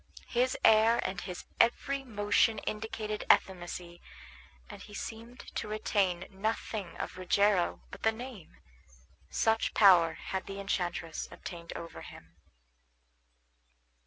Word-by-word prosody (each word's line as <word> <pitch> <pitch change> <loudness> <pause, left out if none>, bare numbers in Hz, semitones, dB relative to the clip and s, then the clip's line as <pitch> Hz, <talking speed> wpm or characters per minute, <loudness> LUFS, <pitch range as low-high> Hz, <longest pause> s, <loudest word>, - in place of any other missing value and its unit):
His 250 +1 +1
air 220 +1 +6
and 190 - -4
his 180 -2 -7
every 275 +4 +2
motion 210 -1 +2
indicated 215 -1 -4
effeminacy, 175 -1 -1 0.7
and - - -10
he 205 - -11
seemed 230 +3 -7
to - - -2
retain 200 -4 0
nothing 200 -2 -3
of 185 - -5
Rogero 190 0 +2
but 200 - -10
the 220 - +3
name; 230 -5 -9 0.7
such 225 - +1
power 175 -6 +7
had 190 0 -5
the 195 0 -6
enchantress 175 -4 -2
obtained 170 -2 -8
over 165 0 -7
him. - - -13
205 Hz, 115 wpm, -31 LUFS, 180-220 Hz, 0.7 s, power